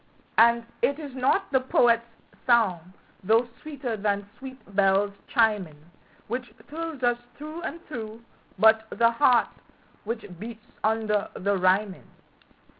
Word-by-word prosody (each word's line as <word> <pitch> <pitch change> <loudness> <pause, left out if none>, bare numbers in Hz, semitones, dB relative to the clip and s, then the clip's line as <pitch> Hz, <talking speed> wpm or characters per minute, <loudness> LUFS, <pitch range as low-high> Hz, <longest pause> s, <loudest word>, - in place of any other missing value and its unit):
And 235 +1 +5 0.2
it 275 +4 +2
is 290 -4 -8
not 270 +9 +1
the 265 - +4
poet's 235 -2 +3 0.4
song, 190 -8 +2 0.3
though 225 +5 +3
sweeter 275 -6 -4
than 200 -1 -1
sweet 260 0 -9 0.2
bells 200 0 +3
chiming, 210 - +1 0.5
Which 245 +2 -4 0.2
thrills 320 -3 -6
us 240 0 +2 0.2
through 310 +3 -7
and 335 - -5
through, 225 -5 -7 0.3
but 220 +2 +5
the 230 0 +3
heart 245 0 +4 0.5
which 225 +2 -4
beats 220 +1 -9 0.2
under 215 -2 +1
the 200 +2 0
rhyming. 190 +1 +1
230 Hz, 125 wpm, -26 LUFS, 210-255 Hz, 0.5 s, And